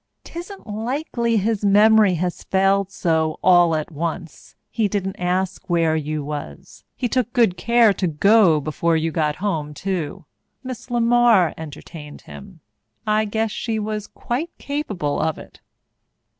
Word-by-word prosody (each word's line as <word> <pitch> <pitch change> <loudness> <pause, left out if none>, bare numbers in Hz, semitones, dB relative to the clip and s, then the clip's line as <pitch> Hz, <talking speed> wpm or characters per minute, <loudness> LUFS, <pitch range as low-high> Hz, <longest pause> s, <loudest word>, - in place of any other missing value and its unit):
"'Tisn't 355 +4 -9
likely 235 +1 -2
his 215 +1 -1
memory 210 -1 +5
has 175 +1 -3
failed 195 0 +2
so 160 -4 0
all 175 -3 +5
at 155 +2 -3
once. 165 +1 -6 0.2
He 220 -3 +1
didn't 195 -1 -3
ask 185 +1 -2
where 165 -2 +2
you 155 -1 -3
was. 145 - -8
He 245 - -2
took 245 -1 -1
good 230 -7 +3
care 230 +3 +4
to 190 - -1
go 175 +1 +4
before 160 +3 0
you 160 +1 -1
got 150 -2 0
home 160 -7 -3
too. 185 -1 -4 0.4
Miss 255 -2 -7
LeMar 235 -6 +3
entertained 150 0 -10
him. 195 -5 -13 0.4
I 215 0 +2
guess 220 +1 -1
she 225 +1 -3
was 215 -1 -4
quite 270 +8 -4
capable 210 - -3
of 160 0 -1
it." - - -14
195 Hz, 145 wpm, -21 LUFS, 160-220 Hz, 0.4 s, memory